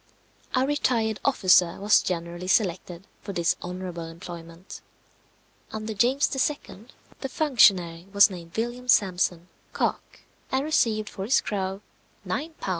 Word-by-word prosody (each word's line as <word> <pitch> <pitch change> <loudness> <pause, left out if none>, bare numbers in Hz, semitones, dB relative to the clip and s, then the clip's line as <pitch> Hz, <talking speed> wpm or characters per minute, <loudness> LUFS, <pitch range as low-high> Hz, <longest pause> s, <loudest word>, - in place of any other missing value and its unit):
A 255 +1 +3
retired 235 -6 0
officer 185 -9 +4
was 205 +2 +4
generally 175 0 -4
selected 185 -2 0 0.2
for 200 - -7
this 170 -2 +1
honourable 180 -1 -6
employment. 170 +1 -10 0.9
Under 220 0 -5
James 250 +7 +2 0.2
II. 240 -7 -11 0.3
the 270 - -4
functionary 190 - +3
was 200 0 +7
named 175 -3 -10
William 240 +2 -3
Sampson, 180 -6 +2 0.3
Cock, - - -3 0.3
and 265 +2 0
received 220 -8 +1
for 190 - -6
his 250 - +3
crow 195 -1 -3 0.4
£9, 320 +3 -3
2s. - - -3
195 Hz, 125 wpm, -25 LUFS, 175-235 Hz, 0.9 s, was